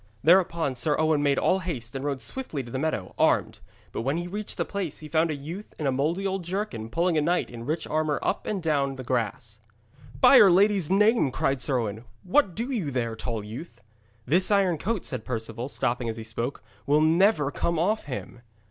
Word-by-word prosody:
Thereupon 170 Hz, -3 st, +3 dB
Sir 145 Hz, +4 st, 0 dB
Owen 155 Hz, -2 st, +2 dB
made 140 Hz, -1 st, +2 dB
all 190 Hz, -, +2 dB
haste, 135 Hz, -10 st, -5 dB
and 135 Hz, -, -4 dB
rode 140 Hz, -2 st, -2 dB
swiftly 150 Hz, -, -4 dB
to 120 Hz, -, -11 dB
the 130 Hz, -, -3 dB
meadow, 140 Hz, -11 st, -2 dB
armed; -, -, +2 dB, 0.3 s
but -, -, -3 dB
when 135 Hz, +6 st, 0 dB
he 175 Hz, -, -3 dB
reached 205 Hz, +3 st, -5 dB
the -, -, 0 dB
place, 195 Hz, -7 st, -4 dB
he 155 Hz, -, -9 dB
found 160 Hz, +1 st, +2 dB
a 155 Hz, -, -1 dB
youth 165 Hz, +9 st, -8 dB
in 150 Hz, -, -4 dB
a 135 Hz, -, +2 dB
mouldy 155 Hz, +9 st, -1 dB
old 190 Hz, -1 st, -1 dB
jerkin 170 Hz, -, -4 dB
pulling 170 Hz, +5 st, +1 dB
a -, -, +1 dB
knight 175 Hz, 0 st, 0 dB
in 120 Hz, 0 st, -8 dB
rich 155 Hz, +3 st, -1 dB
armour 155 Hz, -1 st, 0 dB
up -, -, -1 dB
and 195 Hz, -5 st, -2 dB
down 140 Hz, -4 st, +1 dB
the 130 Hz, -, -7 dB
grass. 115 Hz, -2 st, -3 dB, 0.6 s
'By'r 215 Hz, -, +8 dB
Lady's 195 Hz, -2 st, +3 dB
name!' 210 Hz, -, +4 dB
cried 135 Hz, +1 st, -1 dB
Sir 135 Hz, -1 st, +1 dB
Owen, 110 Hz, -1 st, -3 dB, 0.2 s
'what 190 Hz, -, +2 dB
do 240 Hz, +4 st, -3 dB
you 200 Hz, -, -1 dB
there, 120 Hz, -4 st, -2 dB
tall 115 Hz, -2 st, -4 dB
youth?' 115 Hz, +6 st, -9 dB, 0.4 s
'This 175 Hz, +8 st, +2 dB
iron 195 Hz, -6 st, +2 dB
coat,' 210 Hz, +3 st, -2 dB
said 125 Hz, -4 st, -3 dB
Perceval, 115 Hz, +1 st, -4 dB
stopping 120 Hz, -3 st, -1 dB
as 110 Hz, -, -4 dB
he 115 Hz, -, -6 dB
spoke, 115 Hz, +4 st, -4 dB, 0.2 s
'will 150 Hz, +2 st, +4 dB
never 160 Hz, -1 st, +3 dB
come 170 Hz, +3 st, -1 dB
off 205 Hz, +7 st, 0 dB
him.' 125 Hz, -2 st, -7 dB
150 Hz, 210 wpm, -26 LUFS, 125-185 Hz, 0.6 s, By'r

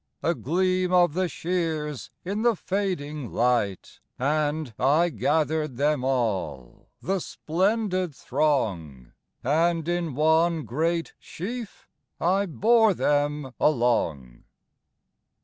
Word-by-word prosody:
A 170 Hz, -, +2 dB
gleam 185 Hz, +4 st, 0 dB
of 175 Hz, -3 st, +4 dB
the 185 Hz, +1 st, 0 dB
shears 160 Hz, -6 st, -3 dB, 0.2 s
in 200 Hz, +4 st, -2 dB
the 235 Hz, -1 st, +3 dB
fading 170 Hz, -, -3 dB
light, 115 Hz, -5 st, 0 dB, 0.2 s
And 150 Hz, -1 st, -1 dB
I 155 Hz, +7 st, +3 dB
gathered 155 Hz, -3 st, 0 dB
them 145 Hz, -1 st, +1 dB
all,—the 110 Hz, -, -2 dB
splendid 185 Hz, -1 st, -1 dB
throng, 100 Hz, -, -1 dB, 0.3 s
And 165 Hz, +4 st, +1 dB
in 175 Hz, -5 st, -1 dB
one 160 Hz, +1 st, +2 dB
great 165 Hz, +6 st, -1 dB
sheaf 225 Hz, +5 st, -7 dB, 0.3 s
I 195 Hz, +4 st, +2 dB
bore 220 Hz, +4 st, +4 dB
them 145 Hz, -3 st, 0 dB
along.. 85 Hz, -, 0 dB
155 Hz, 95 wpm, -25 LUFS, 130-180 Hz, 0.3 s, of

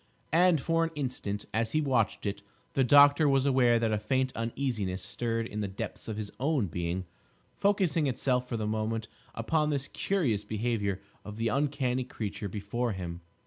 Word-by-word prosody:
And, 175 Hz, -1 st, +5 dB
for 165 Hz, +4 st, +1 dB
an 165 Hz, -, 0 dB
instant, 125 Hz, -8 st, -3 dB
as 110 Hz, 0 st, 0 dB
he 155 Hz, -, +3 dB
watched 130 Hz, -9 st, +1 dB
it, 100 Hz, 0 st, -2 dB, 0.3 s
the 135 Hz, -, +3 dB
doctor 145 Hz, +3 st, +7 dB
was 135 Hz, -1 st, +3 dB
aware 125 Hz, -4 st, +4 dB
that 115 Hz, -1 st, +1 dB
a 105 Hz, -, +1 dB
faint 130 Hz, +4 st, 0 dB
uneasiness 115 Hz, -6 st, -2 dB
stirred 115 Hz, -1 st, -2 dB
in 105 Hz, -1 st, -5 dB
the 105 Hz, -, -1 dB
depths 95 Hz, +1 st, -6 dB
of 110 Hz, -2 st, -4 dB
his 105 Hz, -2 st, -4 dB
own 140 Hz, -3 st, +1 dB
being, 90 Hz, +1 st, -3 dB, 0.5 s
focusing 180 Hz, -7 st, +2 dB
itself 125 Hz, -1 st, 0 dB
for 115 Hz, -, -1 dB
the 110 Hz, -, -2 dB
moment 110 Hz, +1 st, -1 dB, 0.3 s
upon 150 Hz, +7 st, +1 dB
this 140 Hz, -2 st, -1 dB
curious 135 Hz, -, 0 dB
behaviour 105 Hz, -3 st, -1 dB, 0.2 s
of 105 Hz, 0 st, -8 dB
the 115 Hz, 0 st, 0 dB
uncanny 135 Hz, -1 st, 0 dB
creature 105 Hz, -4 st, -5 dB
before 105 Hz, +4 st, -2 dB
him. 85 Hz, -2 st, -6 dB
120 Hz, 175 wpm, -30 LUFS, 105-140 Hz, 0.5 s, doctor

